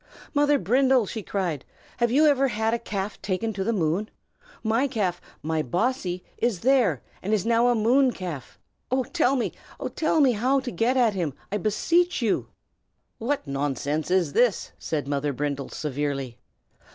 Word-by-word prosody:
"Mother 290 0 +4
Brindle!" 255 +4 +3
she 220 +3 -5
cried. 180 -8 -2 0.3
"Have 240 -1 +2
you 285 +6 +4
ever 275 -2 +4
had 220 -1 0
a 235 - 0
calf 205 -2 -4
taken 195 +3 -2
to 195 -1 -2
the 230 - 0
moon? 185 +1 0 0.5
My 230 +5 +2
calf, 200 -9 -1 0.2
my 160 0 0
Bossy, 180 - -1 0.2
is 230 -7 0
there, 235 - +3 0.2
and 210 +3 +1
is 205 - -2
now 235 +1 +3
a 245 - +3
moon 250 +5 +4
calf. 170 - -7 0.6
Tell 290 -6 +3
me, 250 - 0 0.3
oh! - - -3
tell 315 0 +1
me, 275 -4 +5
how 255 +5 +2
to 255 -2 -5
get 230 +8 +1
at 235 -4 +4
him, 165 -8 -2 0.2
I 205 - 0
beseech 335 - +1
you!" 225 -5 0 0.7
"What 265 - -1
nonsense 145 +2 -2
is 180 -6 +2
this?" 245 -5 +2
said 150 -3 -3
Mother 145 0 -1
Brindle, 140 0 -3
severely. 140 -4 -3
215 Hz, 165 wpm, -25 LUFS, 160-250 Hz, 0.7 s, me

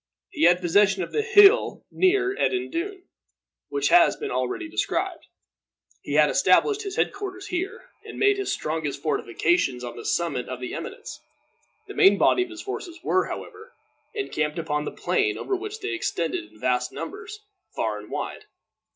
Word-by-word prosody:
He - - +1
had 175 +1 +5
possession 195 +2 +3
of - - -7
the 440 - +1
hill 435 0 +5
near 380 +1 +2
Edendune, 370 -1 -2 0.7
which 420 - 0
has 345 -1 +6
been 430 -2 -5
already 365 -3 -2
described. 320 - -2 0.7
He - - -6
had - - +6
established 425 -1 +3
his 395 -3 -5
head - - +1
quarters 395 -1 -7
here, 375 +7 -4
and - - -10
made 405 0 +3
his 395 - -2
strongest 155 -3 -3
fortifications 140 -1 0
on 120 - -6
the 120 - -8
summit 165 -7 -1
of 130 -1 -5
the 125 - -5
eminence. - - -7 0.7
The - - -8
main 200 +1 +6
body 370 - +4
of 365 - -2
his 345 -1 -9
forces 360 -4 -6
were, 375 - +1
however, 460 +3 -9 0.4
encamped 150 - -2
upon 150 -2 -2
the - - -4
plain, 420 -2 0
over 395 - -2
which 420 +3 -6
they 400 0 -3
extended, 165 - -2
in 110 - -20
vast 125 +1 0
numbers, 430 +2 -7 0.4
far - - -1
and - - -12
wide. - - -5
355 Hz, 170 wpm, -25 LUFS, -, 0.7 s, has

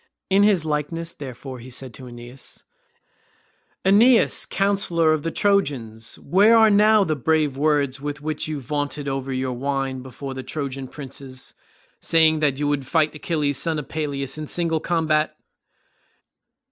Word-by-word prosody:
In 195 +1 +5
his 200 -6 +3
likeness 160 +2 -2
therefore, 130 -1 -8
he 125 +2 -11
said 130 -1 -7
to 130 +3 -10
Aeneas, 120 +2 -10 1.2
"Aeneas, 225 +5 +4
counsellor 185 -5 +2
of 155 - -1
the 165 - -2
Trojans, 135 - -1
where 210 +5 +4
are 220 -1 +6
now 210 +1 +5
the 155 -4 0
brave 150 0 +1
words 140 -2 +1
with 145 0 -4
which 155 0 -3
you 155 -2 -3
vaunted 145 +1 -3
over 135 0 -3
your 130 0 -2
wine 135 0 -2
before 130 +1 -7
the 130 - -5
Trojan 135 -2 -5
princes, 135 -1 -9 0.5
saying 160 -1 +3
that 145 -3 +1
you 145 0 -1
would 145 -3 -1
fight 155 +1 +2
Achilles 150 -3 -1
son 160 +2 0
of 150 - -6
Peleus 140 -2 -3
in 155 - -5
single 165 -1 0
combat?" 155 -2 0
150 Hz, 150 wpm, -23 LUFS, 135-165 Hz, 1.2 s, are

